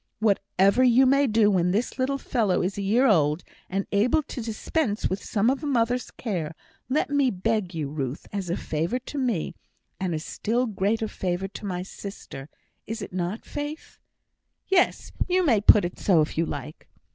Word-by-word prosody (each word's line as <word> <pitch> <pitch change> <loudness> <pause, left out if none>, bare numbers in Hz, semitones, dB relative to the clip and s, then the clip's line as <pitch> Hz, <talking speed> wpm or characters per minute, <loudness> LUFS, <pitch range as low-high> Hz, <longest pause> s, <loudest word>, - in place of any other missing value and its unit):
"Whatever 200 +1 +2
you 255 +1 +6
may 275 +2 +4
do 215 -2 +4
when 180 -2 +2
this 220 +7 -1
little 270 +2 +1
fellow 225 -8 0
is 190 +2 -1
a 200 - -3
year 220 +7 +3
old, 155 - +3 0.3
and 195 +1 -1
able 240 +10 +3
to 255 - -6
dispense 225 +1 -1
with 190 +1 -3
some 210 +1 0
of 265 +2 +2
a - - -2
mother's 245 -2 +1
care, 170 -9 -4 0.3
let 290 +2 0
me 285 -2 +3
beg 200 -2 -1
you, 155 -3 -2
Ruth, 140 -1 -4
as 195 -3 -3
a 175 - 0
favour 165 +10 -1
to 260 +3 -6
me 235 -11 -1 0.5
as 190 -2 -1
a 160 - -1
still 230 +9 -1
greater 220 +1 0
favour 185 -2 -2
to 205 - -7
my 180 -1 -3
sister, 185 -8 -9 0.4
is 225 0 -4
it - - -9
not, 185 +4 -3
Faith?" 295 +2 -6 0.7
"Yes; 380 -2 +2 0.2
you 365 0 +3
may 230 -9 +4
put 205 -2 +7
it 175 - -6
so 175 -6 +4
if 150 - -2
you 165 0 +1
like." 150 - -7
210 Hz, 185 wpm, -26 LUFS, 180-250 Hz, 0.7 s, put